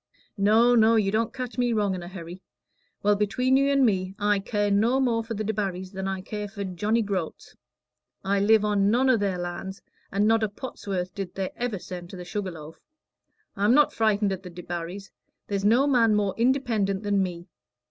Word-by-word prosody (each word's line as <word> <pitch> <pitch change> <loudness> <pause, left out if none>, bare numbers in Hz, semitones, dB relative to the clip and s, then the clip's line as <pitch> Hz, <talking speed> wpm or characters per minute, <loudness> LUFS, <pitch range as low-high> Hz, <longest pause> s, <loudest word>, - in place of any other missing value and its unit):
"No, 220 +4 +5
no, 225 -1 +5
you 205 -3 +2
don't 220 +1 0
catch 255 -1 -6
me 245 -1 +2
wrong 205 -3 +1
in 185 - -4
a 175 - -8
hurry. 175 0 -9 0.6
Well, 205 0 +4
between 250 +6 +1
you 275 +1 +3
and 275 -2 +4
me, 190 -3 0
I 205 -1 +2
care 205 0 -1
no 225 +6 +3
more 235 -4 +1
for 225 0 -5
the 215 - -3
Debarrys 195 -3 -3
than 190 -1 -4
I 190 -1 -3
care 210 +2 -5
for 200 0 -6
Johnny 205 +5 0
Groats. 190 -6 -4 0.7
I 200 +1 +1
live 215 +1 +4
on 205 -1 +2
none 255 +4 +3
o' - - +4
their 200 -3 -1
land, 175 +2 -5 0.3
and 200 +2 +2
not 225 0 +3
a 215 - 0
pot's 210 +2 -9
worth 180 -2 -2
did 195 -3 -6
they 190 -1 -3
ever 240 -4 -2
send 175 -1 -8
to - - -9
the 180 - -8
Sugar 200 +1 -3
Loaf. 160 -2 -11 0.8
I'm 205 +5 +3
not 295 -1 +4
frightened 210 -2 +1
at 190 -1 -4
the 185 - -9
Debarrys: 175 +2 -7 0.4
there's 200 -1 -1
no 235 +7 +4
man 235 -6 +3
more 200 -2 +1
independent 230 -6 +1
than 200 -1 +1
me. 175 -2 -4
205 Hz, 205 wpm, -26 LUFS, 190-225 Hz, 0.8 s, No